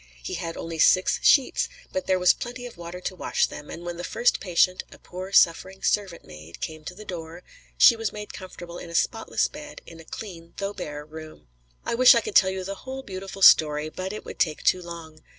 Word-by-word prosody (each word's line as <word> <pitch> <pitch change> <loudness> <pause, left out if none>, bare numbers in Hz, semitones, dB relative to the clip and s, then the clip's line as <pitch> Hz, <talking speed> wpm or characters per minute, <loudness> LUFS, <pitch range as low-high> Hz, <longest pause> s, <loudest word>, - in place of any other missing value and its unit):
He - - -5
had 165 -1 -4
only 165 -1 -6
six 185 +3 +4
sheets, 270 -3 +4 0.2
but 280 0 -3
there 185 - +3
was 180 0 +5
plenty 245 +1 -7
of 245 - -9
water 170 +1 -8
to 185 - -4
wash - - 0
them, 150 - -9
and 170 +1 -8
when 175 -1 -5
the 175 - -6
first 240 +6 +1
patient, 185 0 +2
a - - -13
poor 185 +2 -8
suffering 190 +1 +3
servant 195 -5 -1
maid, 75 +2 -12
came 155 -1 -6
to 180 - -7
the 215 +2 -11
door, 170 -1 -8 0.3
she 235 - +8
was 225 -2 -3
made 210 0 -8
comfortable 175 -2 -9
in 170 - -9
a 170 - -7
spotless 225 +6 +1
bed, 295 0 -11
in 165 - -13
a - - -11
clean 170 -2 -9
though 200 0 -3
bare 150 -5 -7
room. 155 - -12 0.4
I - - -1
wish 250 +1 +7
I 230 - +3
could 215 - -6
tell 190 - +6
you 190 0 -4
the 195 +2 -4
whole 265 +1 -7
beautiful 195 -1 -6
story, 150 -2 +6
but 185 +4 -5
it 215 - -8
would - - -9
take 155 -3 0
too 185 - +3
long. 165 -2 -10
180 Hz, 225 wpm, -25 LUFS, 165-205 Hz, 0.4 s, she